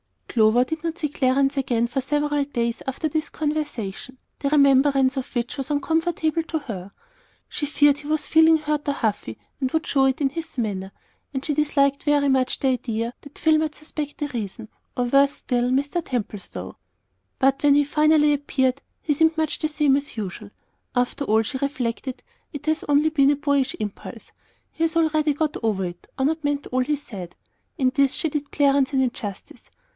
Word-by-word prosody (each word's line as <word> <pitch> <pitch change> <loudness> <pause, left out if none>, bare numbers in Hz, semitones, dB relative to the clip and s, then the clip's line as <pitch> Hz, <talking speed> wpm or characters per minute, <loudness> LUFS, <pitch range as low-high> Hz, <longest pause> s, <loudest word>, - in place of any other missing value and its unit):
Clover 225 +1 +4
did 320 +5 -5
not 335 +1 -3
see 300 - -1
Clarence 275 0 +1
again 240 -3 +1
for 245 +3 -2
several 295 +1 0
days 235 -4 -2
after 265 +4 -1
this 310 +1 -2
conversation, 290 -6 -4 0.2
the 280 - 0
remembrance 275 -2 +4
of 260 - -2
which 240 +4 -2
was 270 -1 -4
uncomfortable 320 +2 0
to 320 0 -3
her. 200 -8 -7 0.6
She 295 - -3
feared 290 -1 +4
he 290 0 -10
was 310 0 -1
feeling 320 0 +6
hurt 300 -1 -2
or 285 - +2
"huffy," 210 - -2 0.2
and 260 -2 0
would 320 0 0
show 270 -1 +2
it 265 +2 +1
in 275 - +3
his 320 +1 -7
manner; 195 -5 -2 0.4
and 265 -1 -3
she 300 - +1
disliked 280 -1 +2
very 290 -1 +3
much 260 -1 +1
the 270 - +2
idea 235 -2 -2
that 285 - -13
Phil 315 0 +4
might 310 -1 -2
suspect 300 -1 -6
the 295 -1 -3
reason, 220 -3 -5 0.3
or, 250 - +2
worse 275 +3 +4
still, 245 -3 -1
Mr. 285 +6 0
Templestowe. 215 -7 -5 0.6
But 270 0 +2
when 285 -1 +5
he 290 - +5
finally 300 +1 +4
appeared 270 -2 0 0.2
he 300 - +1
seemed 320 +2 +2
much 315 -2 -1
the 310 - 0
same 300 -3 +2
as 280 -4 -6
usual. 205 0 -5 0.5
After 245 +3 0
all, 220 -1 +3
she 260 +4 -4
reflected, 260 -2 -3 0.3
it 290 -1 -7
has 315 0 0
only 290 +2 +3
been 280 -3 +4
a - - +2
boyish 285 -2 0
impulse; 210 -2 -7 0.4
he 325 - -3
has 325 0 -2
already 310 -2 +2
got 300 +1 -1
over 210 -5 0
it, 175 0 -8
or 265 - 0
not 315 +2 0
meant 290 -1 -1
all 255 - -1
he 295 +4 +1
said. 200 -11 -9 0.4
In 260 -2 +2
this 275 -2 +3
she 320 - -1
did 290 -1 -3
Clarence 280 -1 +2
an 265 - +3
injustice. 220 -6 -5
280 Hz, 190 wpm, -23 LUFS, 250-300 Hz, 0.6 s, feeling